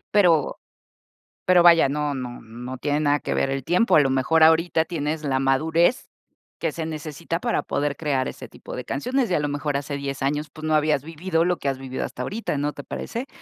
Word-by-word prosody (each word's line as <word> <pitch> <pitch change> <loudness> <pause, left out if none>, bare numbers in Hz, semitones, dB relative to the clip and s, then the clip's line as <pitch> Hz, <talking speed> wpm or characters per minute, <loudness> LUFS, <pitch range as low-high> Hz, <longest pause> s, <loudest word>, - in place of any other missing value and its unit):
Pero 170 -8 +4 0.9
pero 180 -1 +6
vaya, 170 -5 +6
no 145 0 -1
no 125 -2 -6
no 125 +3 -8
tiene 145 0 0
nada 145 -1 +2
que - - -3
ver 135 - +1
el 135 -1 -2
tiempo, 180 - +3
a - - +8
lo 135 - +3
mejor, 135 +5 +2
ahorita 160 0 +4
tienes 160 -2 -3
la 135 -2 0
madurez 160 - +2 0.5
que 165 - -1
se 160 +1 -4
necesita 160 +2 -4
para 235 +3 0
poder 145 0 -2
crear 140 -4 -1
ese - - -8
tipo - - -10
de - - -5
canciones, 250 - -1
y 180 - +1
a - - +2
lo 145 - -1
mejor 145 0 -2
hace 140 +1 -4
10 140 -1 -4
años, 150 +2 -1
pues, 155 +2 -9
no 155 - +1
habías 150 -2 +2
vivido 165 +2 -1
lo 180 0 +1
que 140 - -2
has 135 - -2
vivido 130 0 -5
hasta - - -5
ahorita, 215 -8 -3
¿no 145 +1 -1
te 145 - -9
parece?, 240 - -5
150 Hz, 220 wpm, -24 LUFS, 140-165 Hz, 0.9 s, a